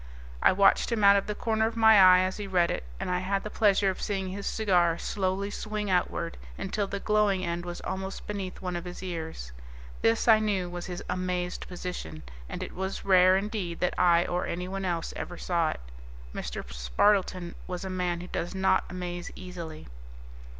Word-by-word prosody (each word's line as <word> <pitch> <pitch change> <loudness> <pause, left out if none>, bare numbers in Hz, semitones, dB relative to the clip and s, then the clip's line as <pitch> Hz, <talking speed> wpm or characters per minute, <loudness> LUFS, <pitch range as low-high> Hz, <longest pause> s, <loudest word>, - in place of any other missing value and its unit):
I - - +6
watched 195 +5 +4
him 225 -3 0
out 200 0 +8
of 200 - +1
the 210 - -2
corner 220 -1 +1
of 230 0 -5
my 220 -2 +7
eye 185 -1 +8
as 185 0 -1
he 205 -1 -5
read 180 -3 +2
it, - - -3 0.2
and - - -3
I 180 - +1
had 195 +2 -1
the 210 - -6
pleasure 200 -2 +3
of 185 - -8
seeing 195 -2 -2
his 200 +2 -5
cigar 175 -6 +2
slowly 195 +1 -2
swing 210 -1 -3
outward 175 -2 0 0.2
until 195 +1 -2
the 200 - -4
glowing 210 -3 +2
end 170 +1 -3
was 175 0 -6
almost 190 +1 -5
beneath 195 -2 -5
one 180 -1 -2
of 175 +1 -4
his 180 +1 -7
ears. 160 - -5 0.5
This, 115 - +2
I 220 -2 +7
knew, 195 -5 -1
was 175 +1 -6
his 180 -1 -5
Amazed 180 -1 -2
Position, 175 - -6 0.3
and - - -4
it - - -7
was 190 +1 -4
rare 185 -1 +6
indeed 195 -4 -3
that 180 - +1
I 175 -1 +4
or 175 0 -1
anyone 185 +2 -3
else 170 -2 -2
ever 175 - -6
saw 170 -3 +1
it. - - -4 0.5
Mr. - - -5
Spardleton 175 - +1
was 180 +1 -4
a - - -4
man 180 -2 -1
who 180 - -8
does 175 +1 -4
not 190 0 +2
amaze 175 -1 -5
easily. 170 -4 -8
185 Hz, 195 wpm, -28 LUFS, 175-200 Hz, 0.5 s, out